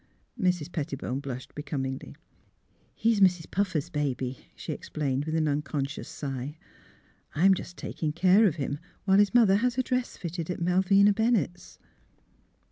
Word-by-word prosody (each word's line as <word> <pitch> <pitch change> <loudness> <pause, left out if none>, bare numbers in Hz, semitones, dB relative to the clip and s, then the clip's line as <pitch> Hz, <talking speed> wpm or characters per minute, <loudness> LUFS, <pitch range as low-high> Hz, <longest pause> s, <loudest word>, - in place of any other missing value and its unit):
" - - -14
Mrs. 175 -3 0
Pettibone 135 -4 -3
blushed 130 -3 -7
becomingly. 135 -3 -4 0.8
He's 225 -1 +2
Mrs. 180 -4 +3
Puffer's 185 -7 -1
baby," 130 -4 -2 0.2
she - - -5
explained, 140 -2 -2
with 155 0 -2
an 160 -1 +2
unconscious 140 -1 -2
sigh. 140 +1 -5
^' - - -29 0.7
I'm 190 +5 +5
just 175 -1 -6
taking 155 -2 -3
care 185 +6 +5
of 165 - 0
him, 145 -1 -3 0.3
while 195 0 +5
his 205 +3 +3
mother 210 -5 +6
has 250 +3 0
a 260 - +2
dress 250 0 -2
fitted 170 -1 -5
at 180 - -3
Mal 180 +2 +2
vina 200 +2 +5
Bennett's." 220 -5 0
170 Hz, 155 wpm, -28 LUFS, 145-195 Hz, 0.8 s, mother